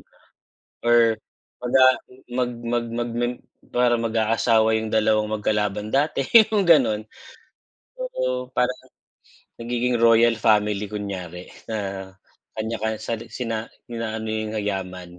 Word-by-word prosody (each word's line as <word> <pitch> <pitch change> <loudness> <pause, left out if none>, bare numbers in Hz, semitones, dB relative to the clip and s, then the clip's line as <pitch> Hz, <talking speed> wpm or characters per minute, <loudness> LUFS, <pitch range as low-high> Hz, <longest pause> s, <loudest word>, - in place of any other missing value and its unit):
nga. - - -27 0.7
Or 120 0 +6 0.6
mag, 125 0 -5
ah, 130 -1 +7 0.3
mag 125 0 0
mag 120 0 -1
mag 120 0 -2
mag 120 +1 -1 0.4
parang 120 -1 +2
mag-aasawa 110 0 +2
'yung 110 0 -3
dalawang 110 0 +3
magkalaban 105 0 -1
dati, 140 +2 +1
'yung 220 -3 +6
ganun. 135 - +4 0.9
Oo, 130 - -3
parang 125 0 +1 0.9
nagiging 120 +1 -1
royal 115 0 +5
family 105 -2 +1
kunyari 95 -4 -6 0.2
na 95 -3 -4 0.5
kanya 110 +1 -2
ka 110 - +1
sa 115 - -2 0.2
sina 115 -3 -3 0.2
inaano 110 -1 -4
yung 110 0 -3
yaman, 90 -3 -5
110 Hz, 120 wpm, -23 LUFS, 105-120 Hz, 0.9 s, ah